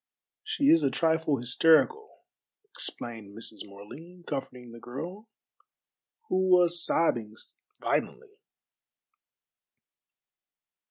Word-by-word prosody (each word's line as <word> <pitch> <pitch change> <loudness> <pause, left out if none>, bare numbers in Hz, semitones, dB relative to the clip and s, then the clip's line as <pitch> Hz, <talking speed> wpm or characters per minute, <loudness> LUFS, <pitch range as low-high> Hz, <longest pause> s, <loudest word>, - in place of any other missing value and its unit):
"She 435 -10 +2
is 165 - +6
a 140 - +2
trifle 160 +1 +1
hysterical," 165 - +2 0.5
explained 115 - -7
Mrs. 110 -1 -5
Morley, 155 - -13
comforting 125 -4 -6
the 115 - -11
girl, 170 - -8 1.0
who 185 0 +1
was 175 -2 +5
sobbing 115 -10 0 0.4
violently. 425 -2 -3
160 Hz, 85 wpm, -28 LUFS, 120-180 Hz, 1.0 s, is